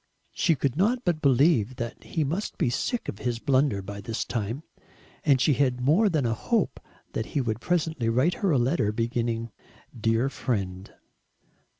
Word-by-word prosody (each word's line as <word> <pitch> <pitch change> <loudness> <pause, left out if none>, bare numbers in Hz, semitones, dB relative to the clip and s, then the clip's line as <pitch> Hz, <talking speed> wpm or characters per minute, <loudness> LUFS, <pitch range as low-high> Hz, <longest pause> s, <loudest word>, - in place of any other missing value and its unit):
She 165 - +2
could 135 -2 -1
not 235 +7 +1
but 170 -4 +1
believe 135 -3 +3
that 120 -1 -6
he 160 - -1
must 170 +9 -3
be 120 - +1
sick 245 - -2
of 100 - -5
his 120 -2 -1
blunder 130 -5 +1
by 100 +1 -7
this 110 +3 -3
time; 115 +5 -3 0.6
and 140 -3 +4
she 145 +3 +4
had 130 -2 +1
more 160 - +4
than 155 -7 0
a 115 - +1
hope 215 - 0 0.3
that 110 - -2
he - - +4
would 115 -3 -2
presently 160 -8 0
write 130 +10 +2
her 195 - -1
a 145 - +3
letter 120 -3 +1
beginning 115 0 -2 0.4
"Dear 115 +2 +1
Friend." 100 -8 -3
125 Hz, 175 wpm, -26 LUFS, 115-155 Hz, 0.6 s, and